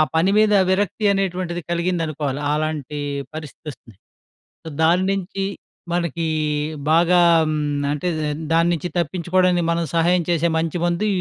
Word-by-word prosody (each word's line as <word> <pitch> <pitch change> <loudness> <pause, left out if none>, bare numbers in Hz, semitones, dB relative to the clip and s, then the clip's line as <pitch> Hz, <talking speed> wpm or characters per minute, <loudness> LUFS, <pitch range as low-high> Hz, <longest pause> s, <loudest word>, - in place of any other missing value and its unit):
పని 170 +4 +3
మీద 215 0 +4 0.2
విరక్తి 200 +2 0
అనేటువంటిది 180 -3 -2
కలిగిందనుకోవాలి. 160 -5 -1
ఆలాంటి 150 -1 -3 0.3
పరిస్థితి 155 0 -9
వస్తుంది. 115 -6 -13 0.7
సో, - - -8
దాని 175 +3 +3
నుంచి 195 0 -3 0.5
మనకి 170 -1 -1 0.7
బాగా 175 +2 +4 0.3
హ్మ్, 155 0 -1 0.3
అంటే 150 +4 -2 0.5
దాని 165 +1 +3
నుంచి 170 +2 -4
తప్పించుకోవడానికి, 175 +2 +1
మనం 170 0 0
సహాయం 175 +2 +3
చేసే 170 0 +2
మంచి 165 +1 -2
మందు, 175 +4 0
170 Hz, 125 wpm, -21 LUFS, 160-180 Hz, 0.7 s, మీద